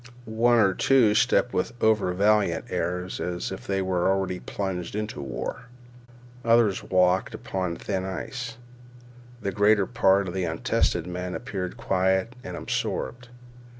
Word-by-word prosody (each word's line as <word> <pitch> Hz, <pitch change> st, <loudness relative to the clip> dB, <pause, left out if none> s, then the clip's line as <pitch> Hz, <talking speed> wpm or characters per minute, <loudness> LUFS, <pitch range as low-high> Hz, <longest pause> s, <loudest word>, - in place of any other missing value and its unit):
One 115 Hz, +2 st, +3 dB
or 100 Hz, -4 st, +4 dB
two 120 Hz, -1 st, +4 dB
stepped 120 Hz, +2 st, +2 dB
with 120 Hz, +6 st, -2 dB
overvaliant 105 Hz, -4 st, +2 dB
airs 90 Hz, +2 st, -2 dB
as 90 Hz, +1 st, -3 dB
if 95 Hz, -, -7 dB
they 95 Hz, -1 st, 0 dB
were 95 Hz, -1 st, +1 dB
already 95 Hz, -1 st, 0 dB
plunged 95 Hz, -3 st, -4 dB
into 105 Hz, -6 st, -4 dB
war. 70 Hz, -, -5 dB, 0.8 s
Others 115 Hz, -4 st, +3 dB
walked 90 Hz, 0 st, +2 dB
as -, -, -8 dB
upon 90 Hz, -3 st, -3 dB
thin 95 Hz, +1 st, -3 dB
ice. 115 Hz, +5 st, -5 dB, 0.9 s
The 100 Hz, -, -1 dB
greater 105 Hz, +1 st, +4 dB
part 100 Hz, -3 st, +3 dB
of 90 Hz, -, -5 dB
the 95 Hz, -1 st, -1 dB
untested 80 Hz, 0 st, 0 dB
men 90 Hz, 0 st, -4 dB
appeared 100 Hz, -3 st, -5 dB
quiet 95 Hz, -1 st, +1 dB
and -, -, -6 dB
absorbed. 120 Hz, +1 st, -3 dB
95 Hz, 140 wpm, -26 LUFS, 90-110 Hz, 0.9 s, or